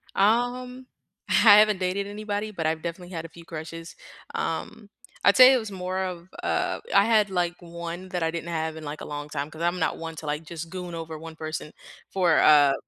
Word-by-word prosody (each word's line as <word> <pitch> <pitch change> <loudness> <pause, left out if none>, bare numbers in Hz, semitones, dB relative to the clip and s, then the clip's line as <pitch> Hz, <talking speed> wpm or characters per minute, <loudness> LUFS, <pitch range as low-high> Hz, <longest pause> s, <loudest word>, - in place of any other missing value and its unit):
Um, 250 +4 +1 0.4
I - - +1 0.3
haven't 210 -2 +4
dated 190 +2 -1
anybody, 210 0 -4
but 165 -5 -4
I've 160 0 0
definitely 175 +2 -6
had 165 -1 -4
a - - -8
few 170 +1 -14
crushes. 165 +1 -8 0.4
Um, 210 +6 -4 0.3
I'd 200 - +5
say 255 +1 +10
it - - +4
was 220 -3 -6
more 185 0 -3
of, 180 -1 -6
uh - - 0 0.2
I - - +7
had, 215 -3 +3
like, 175 -2 0
one 170 +1 -7
that 180 -2 -2
I 160 - +1
didn't 170 0 -5
have 160 -1 -2
in, 160 - -8
like, 145 +1 -6
a - - -6
long 145 0 -5
time, 145 0 -3
'cause 155 - -10
I'm 175 +1 0
not 160 - 0
one 165 0 -6
to, 155 - -7
like, 150 +2 -2
just 165 +1 -7
goon 180 -2 -6
over 160 -1 -6
1 165 0 -9
person 155 -1 -5 0.4
for, 180 -4 +3
uh, 145 -2 +6
170 Hz, 215 wpm, -26 LUFS, 160-200 Hz, 0.4 s, say